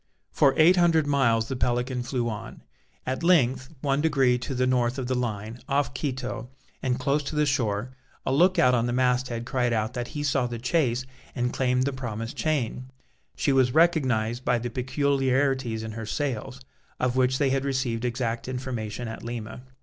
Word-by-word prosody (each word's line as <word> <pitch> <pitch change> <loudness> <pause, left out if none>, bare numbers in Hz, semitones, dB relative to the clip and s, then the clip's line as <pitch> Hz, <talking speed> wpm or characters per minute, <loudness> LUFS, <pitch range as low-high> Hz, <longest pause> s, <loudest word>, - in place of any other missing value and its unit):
For 140 -3 +3
eight 170 +4 +6
hundred 165 -3 +4
miles 120 -6 +2
the 130 - -3
Pelican 125 +1 0
flew 120 -1 -2
on. 110 -3 -6 0.4
At 130 +5 -2
length, 135 -7 +3
one 140 0 +1
degree 135 -6 +3
to 130 +2 -4
the 130 +1 +2
north 125 0 +1
of 130 - -3
the 130 - -1
line, 115 -2 -3
off 140 -1 +1
Quito, 130 -3 -4 0.3
and 125 -1 0
close 140 +3 +1
to 150 +2 -5
the 150 0 +3
shore, 120 -4 0 0.3
a 130 - +1
look 180 +6 +4
out 125 - +5
on 120 -1 +2
the 120 - -1
mast 125 0 +2
head 120 -1 -4
cried 120 -1 0
out 110 +1 -1
that 120 -1 -3
he 145 - -2
saw 135 -3 +1
the 120 -1 -5
chase 130 -1 0 0.3
and 125 -1 -1
claimed 125 -1 +1
the 140 +1 -1
promised 115 -3 -5
chain; 130 -4 -1 0.5
she 140 - +1
was 130 -1 +3
recognized 130 -8 +2
by 125 - +2
the 120 +1 -4
peculiarities 130 -2 0
in 110 - -5
her 110 0 -6
sails, 130 -1 -3 0.4
of 125 0 0
which 130 0 +2
they 140 -2 +2
had 135 0 +1
received 130 -4 -1
exact 120 -1 -2
information 125 -3 -4
at 110 - -7
Lima. 115 -1 -6
125 Hz, 190 wpm, -26 LUFS, 120-135 Hz, 0.5 s, eight